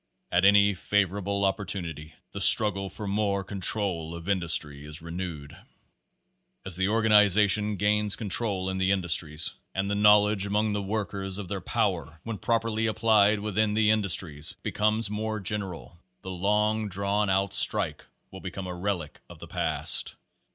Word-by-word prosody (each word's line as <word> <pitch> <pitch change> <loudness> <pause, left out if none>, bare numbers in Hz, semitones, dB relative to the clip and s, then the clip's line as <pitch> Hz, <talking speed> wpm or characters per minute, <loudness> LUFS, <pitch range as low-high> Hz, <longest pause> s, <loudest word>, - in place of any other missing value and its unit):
At 90 +2 +2
any 100 0 +5
favorable 100 +1 -1
opportunity 85 -6 -5 0.2
the - - -7
struggle 100 -3 +7
for 100 +3 -8
more 100 -1 -1
control 95 -4 -1
of 85 +1 -10
industry 80 -7 0
is 75 +2 -4
renewed. 85 -3 -7 1.1
As 95 -2 0
the 95 +1 0
organization 105 -1 +3
gains 105 +1 0
control 100 -3 -1
in 95 - -4
the 95 +1 +1
industries, 85 -4 -1
Page - - -14
Seventeen - - -31
K - - -5
and 100 +1 -1
the 100 0 -1
knowledge 105 -1 +4
among 105 +1 -1
the 105 - -2
workers 100 -2 -4
of 100 -3 -7
their 100 -2 -4
power, 85 -9 -3
when 115 -3 -6
properly 115 0 -1
applied 110 -1 +2
within 105 0 -1
the 105 -1 +3
industries, 90 -8 0
becomes 105 0 0
more 110 0 -3
general, 95 -4 -6 0.2
the 95 - -7
long 105 +3 -1
drawn 100 +2 -1
out 95 0 0
strike - - +2 0.3
will 95 - -11
become 95 0 -7
a 90 - -6
relic 90 -4 -4
of - - -13
the - - -11
past. - - +1
100 Hz, 160 wpm, -26 LUFS, 90-105 Hz, 1.1 s, struggle